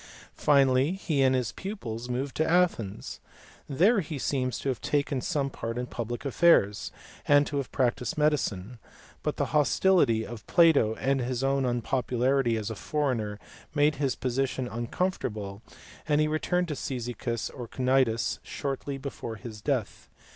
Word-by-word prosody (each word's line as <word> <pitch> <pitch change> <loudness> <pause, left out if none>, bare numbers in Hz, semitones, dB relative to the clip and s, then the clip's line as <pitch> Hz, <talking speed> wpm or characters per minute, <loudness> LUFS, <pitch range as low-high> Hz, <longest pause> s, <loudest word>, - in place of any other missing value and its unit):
Finally 135 +1 +3
he 165 -7 -1
and 130 -1 +4
his 125 -3 0
pupils 125 - -6
moved 130 +3 -3
to 155 - +2
Athens. 160 - 0 0.5
There 195 - +4
he 155 -4 -4
seems 130 -2 -1
to 140 - -3
have 130 - -2
taken 145 -2 0
some 140 -4 -1
part 115 -1 -5
in 125 - -2
public 120 +1 -5
affairs, 130 - +3 0.4
and 145 0 +6
to 145 - -3
have 140 - -3
practised 125 +3 0
medicine; 125 -8 0 0.4
but - - -2
the - - +1
hostility 145 -5 +3
of 115 -2 -9
Plato 160 -11 +5
and 135 +2 0
his 125 +1 -2
own 135 0 +1
unpopularity 125 0 +1
as 110 0 -3
a - - -5
foreigner 120 -6 -1 0.4
made 145 0 +3
his 135 -3 0
position 130 0 -1
uncomfortable, 115 - -3 0.5
and 150 -1 +3
he 155 - +3
returned 175 +3 0
to 150 - -2
Cyzicus 120 -3 -3
or 120 -2 -7
Cnidus 130 -2 +1
shortly 140 0 -4
before 135 -4 -6
his 110 -2 -9
death. 130 -4 -2
130 Hz, 150 wpm, -28 LUFS, 120-145 Hz, 0.5 s, and